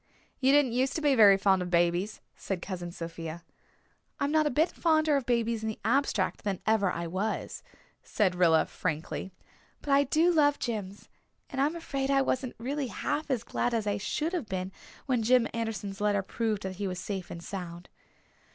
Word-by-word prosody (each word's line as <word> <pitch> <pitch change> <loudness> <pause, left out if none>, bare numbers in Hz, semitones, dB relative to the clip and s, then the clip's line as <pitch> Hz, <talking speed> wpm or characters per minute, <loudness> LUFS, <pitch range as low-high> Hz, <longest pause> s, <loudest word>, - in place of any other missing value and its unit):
"You 265 0 +4
didn't 285 -3 +4
used 260 +3 0
to 320 - -1
be 290 -2 +3
very 205 -5 +7
fond 195 -1 +3
of 180 - -3
babies," 175 +4 +1
said 195 -3 -4
Cousin 175 -1 -5
Sophia. 165 0 -7 0.8
"I'm 280 - 0
not 310 -1 +3
a - - +2
bit 310 +6 +2
fonder 310 -2 +2
of 270 -4 -1
babies 235 -2 +1
in 220 - -2
the 220 - -5
abstract 235 -5 +1
than 200 -3 -2
ever 210 -4 +2
I 170 +1 -3
was," 190 +6 -3 0.4
said 195 -4 +1
Rilla, 170 -3 +4
frankly. 165 +3 -4 0.5
"But 285 - -4
I 280 +1 +5
do 320 +6 +3
love 290 -3 +4
Jims, 205 -4 -5 0.4
and 270 - -1
I'm 300 +4 +1
afraid 275 -5 -3
I 275 -1 +4
wasn't 255 -1 -2
really 270 +4 -3
half 295 +7 -3
as 250 -4 0
glad 240 0 -1
as 220 -2 -1
I 205 -1 0
should 310 - -2
have 325 -11 -2
been 185 0 -3 0.3
when 255 -4 +1
Jim 245 +1 +4
Anderson's 215 -3 -4
letter 205 -1 +2
proved 215 0 -2
that 190 -1 -5
he 200 - -2
was 185 -1 -4
safe 190 -1 -5
and 170 - -8
sound." 175 -2 -7
220 Hz, 190 wpm, -29 LUFS, 185-275 Hz, 0.8 s, very